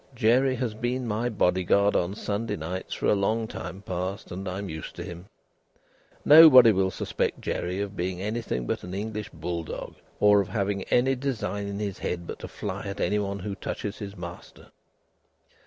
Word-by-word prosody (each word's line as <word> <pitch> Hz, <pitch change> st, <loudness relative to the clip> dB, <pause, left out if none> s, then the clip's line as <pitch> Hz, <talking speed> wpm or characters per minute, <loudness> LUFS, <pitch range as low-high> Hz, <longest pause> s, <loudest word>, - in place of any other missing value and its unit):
Jerry 125 Hz, +3 st, +3 dB
has 120 Hz, -3 st, -2 dB
been 120 Hz, +3 st, -2 dB
my 115 Hz, +3 st, 0 dB
bodyguard 100 Hz, 0 st, +2 dB
on 90 Hz, +3 st, 0 dB
Sunday 105 Hz, 0 st, -2 dB
nights 90 Hz, +2 st, -5 dB
for -, -, -4 dB
a -, -, +5 dB
long 110 Hz, +3 st, 0 dB
time 95 Hz, -1 st, -7 dB
past 95 Hz, +2 st, -4 dB
and 95 Hz, +2 st, -5 dB
I 90 Hz, -, -4 dB
am 100 Hz, 0 st, -4 dB
used 80 Hz, -2 st, -7 dB
to -, -, -6 dB
him. 85 Hz, +2 st, -9 dB, 1.0 s
Nobody 145 Hz, -7 st, +10 dB
will 95 Hz, -2 st, +2 dB
suspect -, -, -2 dB
Jerry 90 Hz, +2 st, -3 dB
of 100 Hz, 0 st, -4 dB
being 90 Hz, 0 st, -2 dB
anything 105 Hz, -, -2 dB
but -, -, -2 dB
an 90 Hz, +1 st, -6 dB
English 105 Hz, +1 st, -4 dB
bull 85 Hz, +1 st, -4 dB
dog, -, -, -7 dB, 0.3 s
or 105 Hz, -1 st, +6 dB
of 95 Hz, -, -4 dB
having 100 Hz, -2 st, -1 dB
any 130 Hz, +2 st, +3 dB
design 115 Hz, -7 st, -3 dB
in 100 Hz, 0 st, -4 dB
his 100 Hz, -2 st, -4 dB
head 85 Hz, -1 st, -3 dB
but -, -, -7 dB
to -, -, -7 dB
fly -, -, -5 dB
at 100 Hz, 0 st, -5 dB
anybody 100 Hz, -2 st, -1 dB
who 100 Hz, -, -3 dB
touches 100 Hz, +1 st, -5 dB
his 100 Hz, -2 st, -7 dB
master." 85 Hz, 0 st, -10 dB
100 Hz, 185 wpm, -27 LUFS, 90-110 Hz, 1.0 s, Nobody